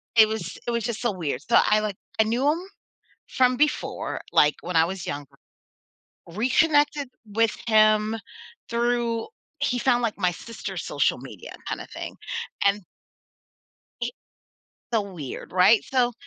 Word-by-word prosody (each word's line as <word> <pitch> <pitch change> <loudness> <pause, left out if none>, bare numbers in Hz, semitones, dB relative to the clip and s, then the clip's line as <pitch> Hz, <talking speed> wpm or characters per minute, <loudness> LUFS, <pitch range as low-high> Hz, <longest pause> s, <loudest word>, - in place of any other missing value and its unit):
it 220 -1 +7
was 185 -5 -4
it 240 - -1
was 235 -2 -1
just 235 -2 -3
so 240 - +1
weird. 170 -7 -3
So 230 - +3
I, 215 0 +3
like, 210 -3 -3 0.2
I - - +7
knew 240 +6 +1
him 315 - +2 0.7
from 255 -1 +3
before, 300 +2 -1
like, 150 0 +5
when 180 0 -5
I 160 - +6
was 185 +1 -5
younger, 145 -1 -5 1.0
reconnected 290 - +2 0.2
with 220 +1 +1
him 215 -1 +4 0.5
through, 235 -1 0 0.3
he 265 -4 0
found 245 -1 +3
like 230 -3 -1
my 180 -3 +2
sister's 230 +6 -6
social - - +1
media - - -10
kinda - - -4
thing. - - -7 0.5
And 200 0 +2 1.2
he - - -2 0.8
So 225 - +3
weird, 175 -10 -7
right? 185 +5 +6
So, 250 -2 +1
220 Hz, 145 wpm, -25 LUFS, 200-245 Hz, 1.2 s, it